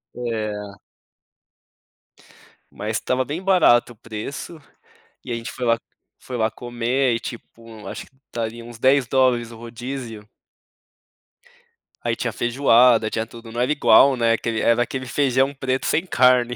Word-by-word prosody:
É. 105 -4 -4 1.9
Mas 110 +1 -3
tava 130 0 -1
bem 155 +6 -4
barato 175 -11 +4
o - - -24
preço, 115 +9 -7 0.6
e - - -8
ai - - -1
a - - -3
gente 115 - -7
foi 125 - -5
lá 115 -1 +3 0.4
foi 125 - -6
lá 110 0 +1
comer 120 +2 -1
e, 115 - -2
tipo, 115 -2 -10
acho - - -7
que 130 - -27 0.2
daria 115 0 -4
uns 120 -1 -11
10 130 +1 +3
dólares 125 -2 +2
o - - -10
rodízio. 120 -1 -7 1.8
Aí - - -1
tinha - - -3
feijoada, 120 -2 +4
tinha 110 +1 -2
tudo, 115 0 -12
não 120 - -5
era 125 +4 +1
igual, 140 -2 +5
né. 115 -2 +2
Aquele 115 -1 -2
era 115 +1 +3
aquele 130 +1 -5
feijão 135 +1 +1
preto 135 -1 -2
sem 165 - +1
carne. 125 -6 +3
120 Hz, 150 wpm, -22 LUFS, 115-130 Hz, 1.9 s, igual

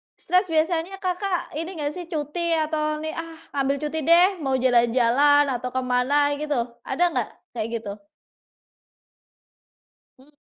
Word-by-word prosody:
stres 365 +3 +1
biasanya 330 +3 0
Kakak 365 0 -2
ini 340 +3 -5
enggak 295 -2 -2
sih 355 - -6
cuti 330 +2 -1
atau 305 -1 -1
nih, 315 - -3
"Ah, 330 -1 -7 0.2
ngambil 275 +1 +1
cuti 315 +2 -3
deh," 345 +2 +7
mau 270 -2 0
jalan-jalan 255 +3 +4
atau 250 0 -3
kemana 260 +3 +2
gitu, 300 -1 -1 0.3
ada 290 +7 0
nggak - - -1 0.2
kayak 225 -2 -3
gitu? 200 -1 -8 2.2
Mmm. 265 +3 -20
300 Hz, 130 wpm, -24 LUFS, 260-335 Hz, 2.2 s, deh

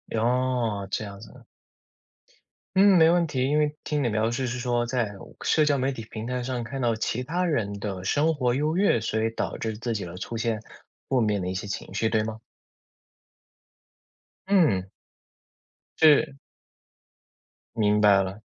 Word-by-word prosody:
哦， 120 -3 0
这 - - -1
样 100 -1 -9
子 110 - -12
的。 - - -16 1.3
嗯， 195 0 +6
没 160 -1 +6
问 175 0 +3
题， 130 -4 -2
因 150 - +2
为 150 0 +1
听 150 -2 -1
你 120 - +1
描 110 +1 0
述 130 +2 -2
是 125 +1 -3
说 120 -1 0
在 120 -3 -1 0.3
社 155 -1 +3
交 145 -2 +2
媒 135 +2 0
体 115 -4 -7
平 110 +1 -5
台 125 -1 -2
上 125 -2 -3
看 135 +4 -6
到 120 -3 +1
其 120 +2 -2
他 175 +6 -1
人 105 - -1
的 95 -3 -5
生 150 +10 +2
活 125 -3 +1
优 155 +5 0
越， 190 - +3
所 110 0 -1
以 115 - 0
导 - - -3
致 110 -1 -3
自 115 -1 -2
己 105 -4 -3
了 85 +1 -8
出 115 +5 -5
现 115 -1 -1 0.5
负 130 -2 +2
面 105 -3 +1
的 90 - -3
一 95 - -3
些 100 - -4
情 100 - -6
绪， 110 +1 +1
对 110 -1 +1
吗？ 110 0 -5 2.1
嗯。 150 - +3 1.1
是。 150 -2 +5 1.4
明 105 -1 +2
白 100 -2 +5
了。 95 +3 -7
120 Hz, 190 characters per minute, -26 LUFS, 110-140 Hz, 2.1 s, 嗯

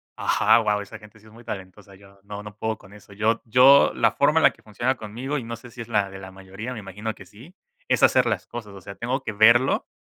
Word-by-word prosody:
ajá, - - +3
guau, 105 0 0
esa 100 - -10
gente 105 0 -17
sí 110 - -23
es 110 - -17
muy 115 +2 -15
talentosa, 95 -1 -9
yo 100 0 -19
no 100 0 -8
no 105 -1 -11
puedo 110 0 -3
con 100 0 -17
eso. 105 -1 -16
Yo 110 +3 0
yo 130 +5 +6
la - - +3
forma 150 +3 +2
en - - 0
la - - +6
que - - -24
funciona 120 +5 -2
conmigo, 120 +7 -5
y - - -8
no 115 0 -6
sé 120 +2 -14
si 120 - -9
es 115 - -8
la 105 -4 0
de 95 - -9
la 95 0 -10
mayoría, 95 +5 -9
me 120 - -7
imagino 105 +2 -6
que 100 - -14
sí, 120 - -16 0.3
es - - +1
hacer - - +5
las - - -2
cosas, 110 -4 -8
o 100 - -12
sea, 100 - -9
tengo 125 +6 -3
que - - -4
verlo 115 +5 +4
110 Hz, 270 wpm, -23 LUFS, 100-120 Hz, 0.3 s, yo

